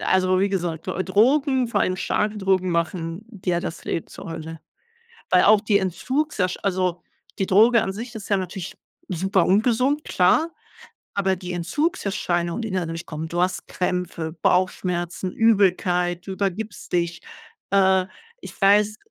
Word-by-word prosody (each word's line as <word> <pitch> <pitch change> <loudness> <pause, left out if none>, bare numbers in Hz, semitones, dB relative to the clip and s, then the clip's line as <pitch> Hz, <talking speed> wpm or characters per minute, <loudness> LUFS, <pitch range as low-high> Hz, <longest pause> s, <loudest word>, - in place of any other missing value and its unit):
also 185 0 +2
wie 200 - +2
gesagt, 175 -4 -3
D 185 - -1
Drogen, 260 +6 +3
vor 235 - 0
allem 185 - +1
starke 210 +3 -1
Drogen 190 -2 +1
machen 170 +3 -2
dir 185 -5 -2
das 165 - -6
Leben 165 - -3
zur - - -10
Hölle. 160 0 -7 0.7
Weil 180 - +5
auch 215 0 +6
die 210 -1 +3
Entzugsersch 190 - -1
also 185 -2 0 0.4
die 195 - +2
Droge 225 +5 +5
an 190 - -2
sich 230 +4 -7
ist 210 - -8
ja 200 - +3
natürlich 185 -1 -5 0.3
super 190 +1 +1
ungesund, 250 +8 +2
klar, 310 - +3 0.6
aber 190 -1 +1
die 180 0 -6
Entzugserscheinungen, 175 - -1
die 225 - -4
dann 185 -2 0
dadurch 165 +1 -6
kommen, 160 +1 -5
du 175 +2 -1
hast 185 +1 -1
Krämpfe, 180 -3 -3
Bauchschmerzen, 180 +1 0
Übelkeit, 180 -5 +2
du - - -4
übergibst 200 +2 -4
dich. 170 -1 0 0.5
Äh, 190 -1 +4 0.4
ich - - -11
weiß 210 +2 +4
185 Hz, 150 wpm, -23 LUFS, 175-210 Hz, 0.7 s, auch